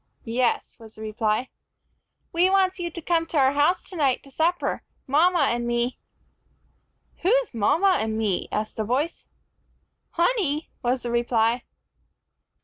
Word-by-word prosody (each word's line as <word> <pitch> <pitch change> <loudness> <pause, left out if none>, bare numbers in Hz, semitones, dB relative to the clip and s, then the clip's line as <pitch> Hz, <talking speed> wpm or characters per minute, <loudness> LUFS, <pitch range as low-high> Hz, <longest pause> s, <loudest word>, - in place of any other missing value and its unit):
"Yes," 240 +1 0
was 225 -1 -14
the 220 - -9
reply. 215 +2 -1 0.8
"We 350 +2 +4
wants 380 -1 +2
you 345 -1 -2
to 340 +1 -7
come 330 -1 +1
to 320 - -2
our 265 -1 +5
house 295 +6 +2
tonight 290 -9 0
to 275 - -14
supper, 335 +5 0 0.2
mama 315 +2 +3
and 240 0 -2
me." 240 +1 -1 1.2
"Who's - - +1
mama 340 - +3
and 220 0 -2
me?" 210 -5 -1
asked 215 0 -3
the 220 - 0
voice. 265 +9 -2 0.9
"Honey," 340 - 0
was 250 +1 0
the 240 - -3
reply. 235 0 +1
270 Hz, 140 wpm, -25 LUFS, 235-345 Hz, 1.2 s, our